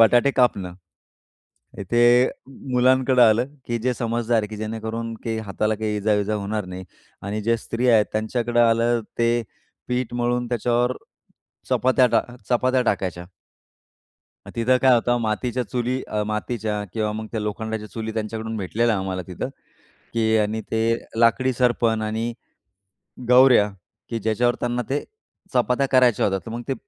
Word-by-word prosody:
बटाटे 120 +4 +5
कापणं. 100 -9 +1 1.0
हे 120 +5 +4
अ, - - -2 0.4
मुलांकडं 130 0 +4
आलं, 115 +2 +4 0.2
की 120 0 -1
जे 125 -1 +1
समजदार 115 0 0
आहे, 105 - -3
की 110 - -7
जेणेकरून 110 +1 -4
की 115 -1 -2
हाताला 110 +2 0
काही 105 0 -2
इजा-विजा 105 0 +1
होणार 105 0 -2
नाही. 95 +1 -7 0.4
आणि 105 +2 -3
ज्या 115 +2 +2
स्त्रिया 120 +1 +1
आहेत 105 -1 +5
त्यांच्याकडं 120 +2 0
आलं, 115 +1 +3 0.2
ते 120 0 +2 0.5
पीठ 125 -1 -2
मळून 120 0 0
त्याच्यावर 120 +1 0 0.7
चपात्या 130 0 +3
टा - - +3 0.3
चपात्या 130 +1 +2
टाकायच्या. 90 -5 -2 1.2
मग - - -8
तिथं 120 +2 +3
काय 130 -1 +6
होतं, 120 +1 +2
मातीच्या 120 +3 -1
चुली, 125 +4 -2
अ, 105 0 -1
मातीच्या 105 -1 -2
किंवा 110 -1 -1
मग 110 +1 -5
त्या 110 - -2
लोखंडाच्या 105 +1 -4
चुली 110 +2 -5
त्यांच्याकडून 110 0 -4
भेटलेल्या 110 +4 0
आम्हाला 95 -1 -3
तिथं, 90 -2 -4 0.6
की 110 -1 +2
आणि 110 +1 0
ते 110 - +1 0.4
लाकडी 120 +3 +3
सर्पण 115 -2 +1
आणि 110 +2 -2 1.0
गवऱ्या, 125 -4 +6 0.4
की 115 - -2
ज्याच्यावर 115 +3 +1
त्यांना 120 0 -1
ते 140 +2 -1 0.5
चपात्या 125 +2 +2
करायच्या 125 -3 +4
होत्या. 95 -1 0
तर - - -6
मग 120 - -5
ते 135 - 0
115 Hz, 145 wpm, -23 LUFS, 110-120 Hz, 1.2 s, काय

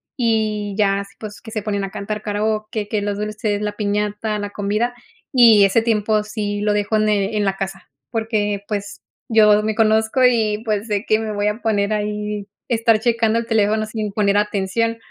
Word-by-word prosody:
y 215 -4 0
ya, 200 -2 +2
así 200 0 -9
pues 210 -2 -8
que 220 - -11
se 215 -2 -3
ponen 200 -1 -2
a 195 - -4
cantar 210 +2 -4
karaoke. 215 0 -2
Que 210 0 -1
los 205 0 -2
dulces, 210 0 -2
la 210 0 -2
piñata, 210 +1 -2
la 205 0 -4
comida 210 +4 -1 0.4
y 230 -5 +7
ese 195 +4 +4
tiempo 215 -2 +1
sí 210 -1 -3
lo 210 0 +1
dejo 205 +1 0
ene 210 0 +1
en 205 - +1
la 195 -1 0
casa. 195 -4 -6 0.2
Porque 210 -3 -1
pues 205 -1 -4 0.3
yo 210 -3 +5
me 215 0 -1
conozco 220 +3 +2
y 220 -3 +2
pues 215 0 -1
sé 205 0 -1
que 215 - +2
me 220 -1 -3
voy 205 0 0
a 210 +3 -2
poner 205 -1 +1
ahí, 210 -1 -3 0.2
estar 230 -2 +2
checando 230 -1 +1
el 230 - -1
teléfono 215 -1 +1
sin 215 -1 -4
poner 200 -1 +2
atención. 210 +2 0
210 Hz, 190 wpm, -20 LUFS, 205-220 Hz, 0.4 s, y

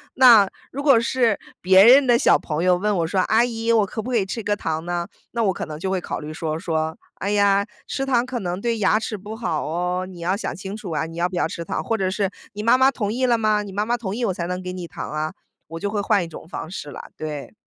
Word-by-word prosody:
那 235 -6 +8 0.2
如 280 - -4
果 270 -6 +6
是 235 -2 +1 0.2
别 190 +2 +7
人 265 +3 +8
的 240 -1 +5
小 - - +5
朋 155 +1 -3
友 180 -1 +5
问 205 +1 0
我 165 -1 0
说： 190 +2 0
“阿 225 +2 +5
姨， 230 -1 -1
我 220 -3 +4
可 220 - -5
不 245 - -6
可 240 - +2
以 195 - +1
吃 225 +4 -4
个 205 - +1
糖 160 -3 -3
呢？” 175 0 -2 0.3
那 235 - 0
我 195 - +2
可 - - -4
能 155 -1 -7
就 190 - -2
会 190 - 0
考 - - -4
虑 155 +1 -7
说， 155 -1 -3
说： 160 -1 -2 0.2
“哎 200 +2 -3
呀， 200 -1 +3 0.2
吃 270 - -2
糖 250 -2 +2
可 255 -1 -4
能 180 -2 -3
对 235 -1 0
牙 215 +1 +3
齿 215 -1 -4
不 210 +3 -8
好 220 -10 -2
哦， 180 +3 -1
你 180 -2 -11
要 180 +3 0
想 - - -4
清 195 +2 -6
楚 205 -6 -7
啊， 160 0 -1
你 165 - -9
要 175 - +1
不 180 - -7
要 170 - +1
吃 170 - -6
糖。” 155 - -2
或 225 +5 -1
者 190 -2 0
是 200 -1 0 0.2
“你 210 - -5
妈 230 +3 +5
妈 260 +1 +5
同 210 -5 -2
意 255 +2 0
了 240 -2 +3
吗？ 215 -1 +1
你 200 - -8
妈 210 +2 0
妈 240 +1 +1
同 195 -5 -4
意 240 - -3
我 190 - 0
才 170 -1 -4
能 180 0 -3
给 180 0 -5
你 180 -2 -6
糖 - - -7
啊。” 155 +1 -2 0.4
我 165 - -6
就 205 - -2
会 210 -1 -1
换 200 -2 +2
一 - - -6
种 160 0 -11
方 170 -1 -6
式 150 -6 -6
啦， - - -9
对。 150 -2 -6
195 Hz, 305 characters per minute, -22 LUFS, 175-225 Hz, 0.4 s, 那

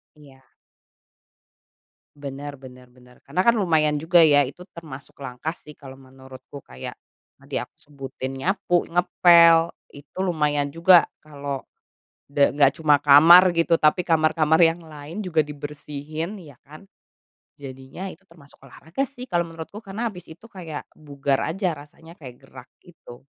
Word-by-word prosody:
Iya. 135 -3 -19 1.7
Benar 140 0 -8
benar 125 -1 -15
benar, 125 0 -22
karena 145 +6 -3
kan 235 - +5
lumayan 160 -7 +1
juga, 160 +4 +2
ya. 145 -3 +6
Itu 160 +7 -8
termasuk 150 -5 -11
langkah, 135 +5 -5
sih, 150 -3 -16
kalau 135 -2 -12
menurutku. 130 0 -14
Kayak 65 0 -9 0.4
tadi - - -12
aku - - -13
sebutin, 135 -2 -8
nyapu, 175 +4 0
ngepel, 170 -1 +5 0.2
itu 145 +5 -15
lumayan 150 -6 0
juga 170 +1 +5 0.2
kalau 140 -2 -7 0.7
da 140 0 +2
enggak 140 -1 +3
cuma 150 -2 +4
kamar 170 +6 +7
gitu, 165 0 +2
tapi 155 +4 +3
kamar-kamar 160 -1 +2
yang 165 0 +3
lain 155 +5 -9
juga 165 -4 -1
dibersihin, 150 +4 -7
ya 140 -5 -16
kan. 155 +5 -14 0.7
Jadinya 135 +6 -9
itu 195 +4 -18
termasuk 165 -6 -20
olahraga, 165 - -5
sih, 255 -2 -11
kalau 175 -1 0
menurutku, 165 +4 -10
karena 220 +4 -4
habis 180 -3 -12
itu 160 +8 -15
kayak 165 -8 -9
bugar 140 -2 -2 0.2
aja 190 -1 -1
rasanya, 160 +4 -15
kayak 130 -5 -12
gerak 130 -1 -15
gitu. 135 -7 -16
150 Hz, 140 wpm, -23 LUFS, 140-170 Hz, 1.7 s, kamar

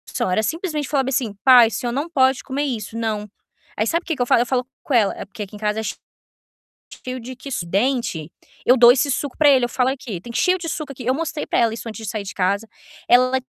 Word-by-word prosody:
Só, - - -2
era 220 +4 +1
simplesmente 315 - -2
falava, 270 -3 0
assim: 245 -5 -1
"Pai, 250 -3 +8
o - - -5
senhor 240 +1 -3
não 285 +7 -3
pode 265 -4 +2
comer 280 +2 -2
isso", 230 -6 -4
não. 215 -2 -3 0.5
Aí 215 - 0
sabe 335 +6 0
o - - -32
que 325 - -2
que 255 - -5
eu - - +3
falo? 240 - +4
Eu - - +1
falo 250 0 -1 0.2
com 285 - -3
ela 220 -5 +3
é - - -6
porque 210 +2 -7
aqui 200 +1 -11
em - - -10
casa 210 0 -1
é - - -3
che 210 - -3 1.1
cheio 255 0 -5
de 250 +2 -9
quis 270 +1 -5
dente, 195 - -1 0.3
eu 250 - +6
dou 240 -2 +8
esse 275 +3 +3
suco 280 +1 -2
pra 300 - +5
ele, 265 -3 +5
eu - - -1
falo: 250 +1 +1
"Aqui, 245 -9 -5
tem 235 +6 -9
cheio 365 +9 +2
de 335 -2 -6
suco 305 -3 -4
aqui". 255 -2 -10
Eu 255 +2 +1
mostrei 320 +1 -3
pra - - 0
ela 230 -2 +2
isso, 230 - -7
antes 220 0 -8
de 205 - -3
sair 215 -3 -3
de 200 - -7
casa. 200 +3 0 0.4
Ela 255 +1 +4
245 Hz, 265 wpm, -21 LUFS, 220-275 Hz, 1.1 s, Pai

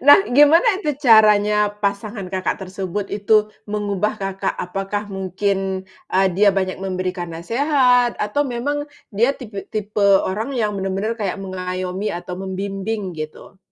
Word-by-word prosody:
Nah, 285 - +10 0.2
gimana 295 +8 +7
itu 325 - -4 0.2
caranya 210 -3 +6 0.3
pasangan 200 0 -2
Kakak 185 0 -1
tersebut 190 +1 -4
itu, 205 +1 -1 0.4
mengubah 210 0 -1
Kakak? 195 0 -2
Apakah 195 +3 -3
mungkin, 190 +1 -1 0.6
eee, 190 +1 +4
dia 205 +1 +5
banyak 185 -1 -2
memberikan 185 -1 -3
nasehat 245 - +2
atau 210 +7 -1
memang 265 +5 -1 0.4
dia 235 +5 +4
tipi 215 -7 -8
tipe 215 -1 -3 0.3
orang 210 +6 -2
yang 220 -4 0
benar-benar 195 +3 -1
kayak 200 -4 -2
mengayomi 185 +1 -4
atau 180 +1 -7
membimbing 195 +3 -3 0.2
gitu? 155 +5 -8
200 Hz, 130 wpm, -20 LUFS, 190-220 Hz, 0.6 s, Nah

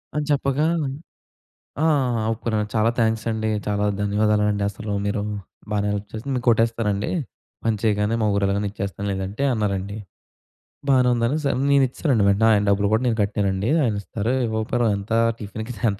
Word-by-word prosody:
అని 150 0 0
చెప్పగా 140 +1 +1 1.2
ఆ! - - +4
ఆ! 130 -7 +2
ఒప్పుకున్నాను. 110 -1 -1
"చాలా 110 +1 +3
థ్యాంక్స్ 110 -1 +1
అండి, 110 0 -1 0.2
చాలా 105 0 0 0.2
ధన్యవాదాలండి. 105 0 +1
అసలు 105 +1 -6
మీరు 100 +1 -1 0.5
బానే 105 -1 0
హెల్ప్ 105 0 -3
చేసారు. 110 +6 -5
మీకు 125 -1 -2
కొట్టేస్తానండి, 115 -3 +1 0.5
పని 115 -1 +1
చేయగానే, 105 0 +1
మా - - +3
ఊరెల్లగానే 100 +1 +1
ఇచ్చేస్తాను 100 0 -5
లేదంటే" 95 +5 -4
అన్నారండి. 100 -2 -2 0.9
బానే 130 -2 +5
ఉందనేసి, 135 +5 0 0.2
నేనిచ్చేసానండి 130 -4 +2
వెంటనే. 100 +3 +3
ఆయన 105 -1 +3
డబ్బులు 100 0 +2
కూడా 110 - +3
నేను 115 -2 +1
కట్టానండి. 100 0 0
ఆయనిస్తారు, 110 0 -1
ఇవ్వకపోయిన 110 +2 0
ఎంత 100 +3 -5 0.3
టిఫిన్‌కి 110 +3 -6 0.2
ఎంత 100 - -7
110 Hz, 145 wpm, -23 LUFS, 100-115 Hz, 1.2 s, బానే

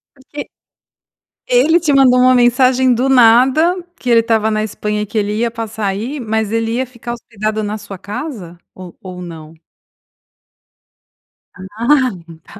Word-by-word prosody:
Porque 285 +2 -9 1.0
ele 355 -10 +3
te 310 -3 0
mandou 255 -2 +5
uma 255 0 +5
mensagem 250 +1 +3
do 255 +3 0
nada, 260 +8 +4 0.2
que 250 - -4
ele 230 -1 +5
estava 220 -1 0
na 215 0 -1
Espanha 210 0 -3
e - - -2
que 215 +2 -6
ele 210 0 -1
ia 235 +1 0
passar 220 -2 -4
aí, 230 +9 -4
mas 220 -2 -2
ele 225 0 -1
ia 260 +2 -1
ficar 235 -1 -8
hospedado 215 -2 -4
na 210 +1 -3
sua 195 -2 -10
casa? 200 - -7 0.2
Ou 185 -2 -11
ou 180 -1 -9
não? 160 -2 -10 2.0
Ah, 235 +8 0 0.3
tá. - - -15
230 Hz, 155 wpm, -16 LUFS, 210-255 Hz, 2.0 s, mandou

